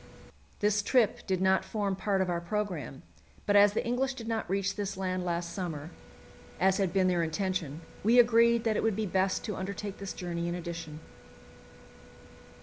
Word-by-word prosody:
This 210 Hz, 0 st, +3 dB
trip 230 Hz, 0 st, +2 dB
did 185 Hz, -1 st, 0 dB
not 190 Hz, 0 st, +3 dB
form 200 Hz, -3 st, -2 dB
part 195 Hz, 0 st, 0 dB
of 185 Hz, -, 0 dB
our 170 Hz, -1 st, -1 dB
programme, 170 Hz, -, -4 dB, 0.4 s
but 205 Hz, -, +2 dB
as 205 Hz, 0 st, +7 dB
the -, -, -1 dB
English 260 Hz, +3 st, 0 dB
did 230 Hz, -3 st, -8 dB
not 225 Hz, -1 st, -2 dB
reach 195 Hz, +1 st, 0 dB
this 200 Hz, -2 st, -4 dB
land 185 Hz, -1 st, -2 dB
last 170 Hz, -1 st, -2 dB
summer, 165 Hz, -4 st, -5 dB, 0.7 s
as 190 Hz, 0 st, +3 dB
had 195 Hz, -4 st, +1 dB
been 185 Hz, +1 st, +2 dB
their 175 Hz, -2 st, +2 dB
intention, 165 Hz, -2 st, -2 dB, 0.2 s
we 230 Hz, +4 st, +4 dB
agreed 235 Hz, -1 st, +5 dB
that 225 Hz, -2 st, +1 dB
it -, -, +1 dB
would 225 Hz, -3 st, +1 dB
be 215 Hz, +1 st, -1 dB
best 190 Hz, 0 st, 0 dB
to 210 Hz, -4 st, -3 dB
undertake 200 Hz, +1 st, -5 dB
this 195 Hz, -1 st, -5 dB
journey 170 Hz, -1 st, -4 dB
in 175 Hz, -, -2 dB
addition. 165 Hz, -3 st, -6 dB
190 Hz, 180 wpm, -30 LUFS, 175-210 Hz, 0.7 s, as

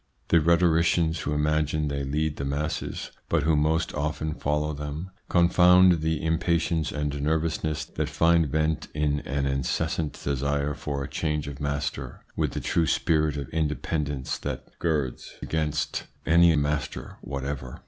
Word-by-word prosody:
The 85 Hz, -, +6 dB
rhetoricians 85 Hz, 0 st, +3 dB
who 75 Hz, -, -2 dB
imagine 75 Hz, 0 st, +1 dB
they 70 Hz, -1 st, -2 dB
lead 75 Hz, +2 st, -1 dB
the -, -, -3 dB
masses, 75 Hz, +3 st, -3 dB, 0.2 s
but -, -, +2 dB
who 80 Hz, +1 st, +3 dB
most 80 Hz, +2 st, +1 dB
often 75 Hz, +1 st, -2 dB
follow 75 Hz, +1 st, -1 dB
them, 75 Hz, +5 st, -5 dB, 0.2 s
confound 90 Hz, 0 st, +6 dB
the 80 Hz, 0 st, -1 dB
impatience 80 Hz, -1 st, +1 dB
and 75 Hz, -1 st, -2 dB
nervousness 80 Hz, 0 st, 0 dB
that -, -, -3 dB
find 85 Hz, -1 st, +3 dB
vent 80 Hz, +1 st, 0 dB
in 75 Hz, -1 st, +1 dB
an 70 Hz, -1 st, -2 dB
incessant 70 Hz, +3 st, -1 dB
desire 70 Hz, +1 st, 0 dB
for 70 Hz, -1 st, -4 dB
a -, -, -4 dB
change 75 Hz, 0 st, -2 dB
of 70 Hz, -1 st, -7 dB
master 70 Hz, 0 st, -3 dB
with -, -, 0 dB
the -, -, -2 dB
true 80 Hz, -1 st, +1 dB
spirit 75 Hz, -2 st, +2 dB
of 70 Hz, -2 st, -4 dB
independence 75 Hz, -3 st, -2 dB
that 65 Hz, 0 st, -5 dB
girds 75 Hz, -7 st, -2 dB
against 75 Hz, -1 st, -1 dB, 0.2 s
any 85 Hz, 0 st, +6 dB
master 75 Hz, -2 st, -2 dB
whatever. 70 Hz, -2 st, -5 dB
75 Hz, 145 wpm, -26 LUFS, 70-80 Hz, 0.2 s, The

